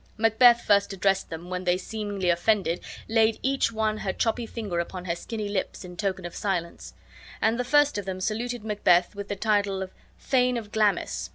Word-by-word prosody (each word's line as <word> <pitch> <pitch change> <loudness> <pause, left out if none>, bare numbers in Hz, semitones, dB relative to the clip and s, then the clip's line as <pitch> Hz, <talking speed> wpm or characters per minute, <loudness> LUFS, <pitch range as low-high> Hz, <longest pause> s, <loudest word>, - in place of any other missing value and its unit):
Macbeth 235 +2 +5
first 200 -1 +3
addressed 195 0 +1
them, 170 +2 -8
when 180 0 -3
they, 180 0 +2
seemingly 200 -2 -2
offended, 180 0 +1 0.3
laid 225 0 +3
each 270 -3 +1
one 215 -1 -1
her 195 - -2
choppy 230 +3 -1
finger 205 -8 -4
upon 180 +1 -5
her 170 -2 -1
skinny 215 +4 -5
lips, 200 -1 -3
in 180 0 -10
token 190 -1 -2
of 175 - -6
silence; 180 -4 -3 0.4
and 225 +2 +1
the - - +1
first 290 -1 +3
of 200 - -6
them 190 -1 -4
saluted 230 +4 -2
Macbeth 180 -4 +3
with 200 0 -7
the 205 - -3
title 205 -2 +1
of 185 - -10 0.3
Thane 250 -2 +2
of 215 -3 -7
Glamis. 210 -2 0
205 Hz, 190 wpm, -26 LUFS, 185-225 Hz, 0.4 s, Macbeth